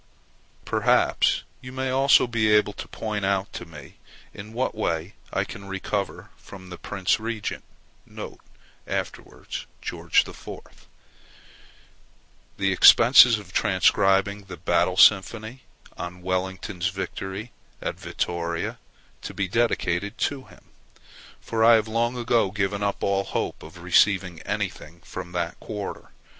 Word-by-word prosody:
Perhaps -, -, +2 dB, 0.2 s
you 125 Hz, -, -9 dB
may 130 Hz, 0 st, -2 dB
also 135 Hz, +1 st, +5 dB
be 115 Hz, -3 st, +1 dB
able 105 Hz, -1 st, +4 dB
to -, -, -8 dB
point 105 Hz, -2 st, -4 dB
out 95 Hz, 0 st, 0 dB
to 90 Hz, -, -6 dB
me 75 Hz, -3 st, -13 dB, 0.3 s
in 105 Hz, +1 st, -9 dB
what 125 Hz, +3 st, -1 dB
way 85 Hz, -3 st, -2 dB, 0.2 s
I -, -, 0 dB
can 100 Hz, -, -9 dB
recover 95 Hz, +1 st, -4 dB
from 95 Hz, -2 st, -12 dB
the 90 Hz, -, -8 dB
Prince 100 Hz, -1 st, 0 dB
Regent 110 Hz, -1 st, -4 dB, 1.2 s
[afterwards -, -, -5 dB
George -, -, +1 dB
IV.] -, -, -11 dB, 1.7 s
the 95 Hz, -1 st, +1 dB
expenses 115 Hz, +4 st, +8 dB
of 100 Hz, -4 st, -12 dB
transcribing 95 Hz, 0 st, +2 dB
the 95 Hz, -2 st, -9 dB
"Battle 90 Hz, 0 st, +1 dB
Symphony" 110 Hz, +6 st, +4 dB, 0.3 s
on 90 Hz, 0 st, -7 dB
Wellington's 95 Hz, 0 st, -2 dB
victory 95 Hz, +3 st, -5 dB, 0.3 s
at -, -, -3 dB
Vittoria, 85 Hz, -1 st, -3 dB, 0.4 s
to -, -, -7 dB
be 100 Hz, -2 st, -1 dB
dedicated 100 Hz, -2 st, 0 dB
to 140 Hz, -2 st, -2 dB
him, -, -, -18 dB, 0.8 s
for 110 Hz, -1 st, -1 dB
I 115 Hz, +1 st, +8 dB
have 110 Hz, -1 st, +1 dB
long 115 Hz, +2 st, 0 dB
ago 115 Hz, -4 st, +2 dB
given 100 Hz, 0 st, -2 dB
up 100 Hz, -1 st, -2 dB
all 100 Hz, 0 st, +1 dB
hope -, -, -3 dB
of -, -, -12 dB
receiving 95 Hz, -5 st, +3 dB
anything 85 Hz, +2 st, -4 dB
from 90 Hz, -1 st, -8 dB
that 85 Hz, -1 st, -3 dB
quarter. 105 Hz, -3 st, -6 dB
100 Hz, 125 wpm, -25 LUFS, 95-110 Hz, 1.7 s, expenses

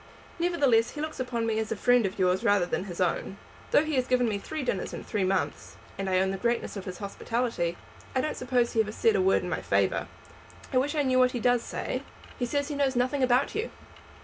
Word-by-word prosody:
Nevertheless, 285 Hz, -10 st, +3 dB
he -, -, -6 dB
looks 310 Hz, -1 st, -4 dB
upon 245 Hz, -3 st, -1 dB
me 220 Hz, -1 st, 0 dB
as 220 Hz, 0 st, -3 dB
a -, -, +1 dB
friend 245 Hz, 0 st, +3 dB
of 190 Hz, -, -7 dB
yours 185 Hz, 0 st, +2 dB
rather 205 Hz, -3 st, +4 dB
than 180 Hz, -, -2 dB
his 175 Hz, -3 st, -7 dB
own. 185 Hz, +2 st, -1 dB, 0.3 s
Though -, -, +5 dB
he 310 Hz, -1 st, -3 dB
has 255 Hz, 0 st, +1 dB
given 250 Hz, -1 st, +3 dB
me 205 Hz, -2 st, -1 dB
three 310 Hz, +7 st, -5 dB
dinners 200 Hz, -7 st, -2 dB
in -, -, -7 dB
three 205 Hz, -3 st, -1 dB
months, 185 Hz, 0 st, -1 dB, 0.2 s
and 195 Hz, 0 st, -3 dB
I 185 Hz, -, +2 dB
own 190 Hz, 0 st, +1 dB
the 195 Hz, -, -4 dB
greatness 235 Hz, 0 st, -1 dB
of 195 Hz, -, -6 dB
his 180 Hz, -1 st, -6 dB
hospitality, 200 Hz, -3 st, -2 dB, 0.4 s
I 260 Hz, -, +3 dB
don't 305 Hz, -, -2 dB
suppose 245 Hz, -1 st, +1 dB
he 225 Hz, -, +1 dB
ever 210 Hz, -1 st, -3 dB
said 450 Hz, -, +2 dB
a -, -, +3 dB
word 380 Hz, +1 st, +3 dB
in -, -, -4 dB
my -, -, -1 dB
favour. -, -, +1 dB, 0.7 s
I 255 Hz, -, +5 dB
wish 290 Hz, +4 st, -1 dB
I 295 Hz, -, +2 dB
knew 255 Hz, -1 st, +3 dB
what 255 Hz, 0 st, +4 dB
he 245 Hz, -, -2 dB
does 245 Hz, 0 st, +3 dB
say." -, -, -4 dB, 0.4 s
"He 245 Hz, -, 0 dB
says 285 Hz, +3 st, -1 dB
he 295 Hz, -, -3 dB
knows 275 Hz, -2 st, +1 dB
nothing 255 Hz, +3 st, +1 dB
about 255 Hz, +1 st, +3 dB
you." 440 Hz, +2 st, -2 dB
245 Hz, 245 wpm, -28 LUFS, 200-265 Hz, 0.7 s, Though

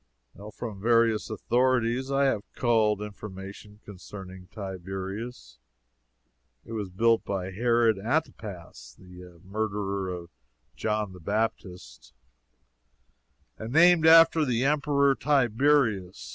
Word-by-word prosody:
From 105 Hz, -5 st, -7 dB
various 115 Hz, -1 st, +2 dB
authorities 125 Hz, +3 st, 0 dB
I 140 Hz, 0 st, +1 dB
have 110 Hz, -7 st, -1 dB
culled 110 Hz, -4 st, +1 dB
information 105 Hz, 0 st, -10 dB
concerning 95 Hz, -1 st, -11 dB
Tiberias. 95 Hz, -, -7 dB, 1.1 s
It -, -, -12 dB
was 105 Hz, -4 st, -4 dB
built 115 Hz, +5 st, +2 dB
by 95 Hz, -1 st, -4 dB
Herod 115 Hz, 0 st, +2 dB
Antipas, 100 Hz, -, -4 dB
the 90 Hz, -2 st, -14 dB
murderer 100 Hz, -1 st, -3 dB
of 85 Hz, -1 st, -7 dB, 0.4 s
John 105 Hz, -3 st, -2 dB
the 90 Hz, -, -12 dB
Baptist, 90 Hz, -, -4 dB, 1.4 s
and 110 Hz, +1 st, -6 dB
named 170 Hz, 0 st, +6 dB
after 165 Hz, 0 st, +7 dB
the 125 Hz, -2 st, 0 dB
Emperor 140 Hz, -1 st, +2 dB
Tiberius. 130 Hz, -7 st, +1 dB
105 Hz, 100 wpm, -27 LUFS, 95-125 Hz, 1.4 s, after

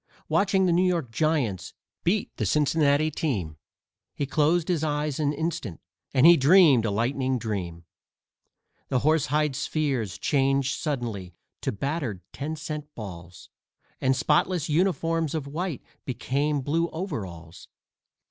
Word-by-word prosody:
Watching 195 Hz, -1 st, +2 dB
the 180 Hz, -, +3 dB
New 170 Hz, +2 st, +3 dB
York 175 Hz, -9 st, 0 dB
Giants 135 Hz, -, -1 dB, 0.3 s
beat 195 Hz, +4 st, 0 dB
the -, -, -1 dB
Cincinnati 150 Hz, 0 st, +2 dB
team, 100 Hz, -, -2 dB, 0.6 s
He 145 Hz, -, -1 dB
closed 155 Hz, +4 st, +2 dB
his 170 Hz, -4 st, 0 dB
eyes 150 Hz, -1 st, -1 dB
an 145 Hz, -2 st, +1 dB
instant 150 Hz, -, -3 dB, 0.3 s
and 130 Hz, +2 st, +4 dB
he 170 Hz, 0 st, +9 dB
dreamed 140 Hz, -, +6 dB
a -, -, +1 dB
lightning 130 Hz, +5 st, 0 dB
dream. 90 Hz, -7 st, -4 dB, 1.0 s
The 125 Hz, -, 0 dB
horsehide 150 Hz, -1 st, +2 dB
spheres 130 Hz, -, -1 dB
changed 135 Hz, +2 st, +1 dB
suddenly 115 Hz, -, -4 dB, 0.3 s
to -, -, -1 dB
battered 130 Hz, -, -3 dB
ten 150 Hz, +3 st, -4 dB
cent 150 Hz, -1 st, -6 dB
balls, 90 Hz, -5 st, -9 dB, 0.5 s
And 130 Hz, 0 st, +3 dB
spotless 155 Hz, +4 st, +1 dB
uniforms 165 Hz, -2 st, +1 dB
of 155 Hz, -3 st, -2 dB
white 160 Hz, +2 st, -4 dB, 0.2 s
became 140 Hz, +3 st, -1 dB
blue 165 Hz, +5 st, 0 dB
overalls. 95 Hz, -, -6 dB
145 Hz, 130 wpm, -26 LUFS, 120-160 Hz, 1.0 s, he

